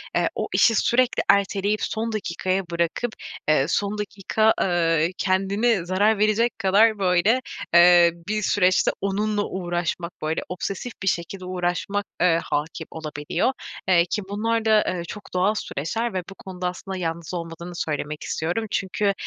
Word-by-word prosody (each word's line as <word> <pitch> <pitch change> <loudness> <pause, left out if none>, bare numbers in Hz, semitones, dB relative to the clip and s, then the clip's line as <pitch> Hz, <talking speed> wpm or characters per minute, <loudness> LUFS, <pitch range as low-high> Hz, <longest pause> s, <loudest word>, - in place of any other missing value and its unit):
eee, - - +2
o - - -2
işi 225 - +5
sürekli 250 +3 +2
erteleyip 200 +1 +2
son 225 +1 -2
dakikaya 190 -2 -1
bırakıp, 170 +7 -1 0.3
eee, 155 -3 +4
son 205 +3 0
dakika, 210 +2 +1
eee, 165 -2 +2
kendine 195 +2 +1
zarar 205 +4 +2
verecek 215 +2 +1
kadar 205 +3 +4
böyle, 190 +7 +3 0.3
eee, 175 0 +7 0.2
bir 215 0 -1
süreçte 185 -2 +3
onunla 205 +1 0
uğraşmak, 175 -1 -3
böyle 155 +1 -1
obsesif 195 +6 -4
bir - - -3
şekilde 185 +1 -2
uğraşmak, 185 +3 -2 0.2
eee, 170 -2 +4
hâkim 155 +2 -3
olabiliyor. 155 - -2 0.4
Eee, 175 -2 +5
ki 210 +4 -2
bunlar 225 +2 -1
da, 215 -1 +5
eee, 180 -2 -2
çok 210 +3 -9
doğal 185 +3 +2
süreçler 225 +10 -3
ve 185 - -1
bu 195 - -10
konuda 185 -2 -5
aslında 190 +1 -5
yalnız 165 -1 -4
olmadığını 170 0 -6
söylemek 150 -2 -3
istiyorum. 175 +8 -2
Çünkü, 200 +1 0
190 Hz, 145 wpm, -24 LUFS, 170-210 Hz, 0.4 s, eee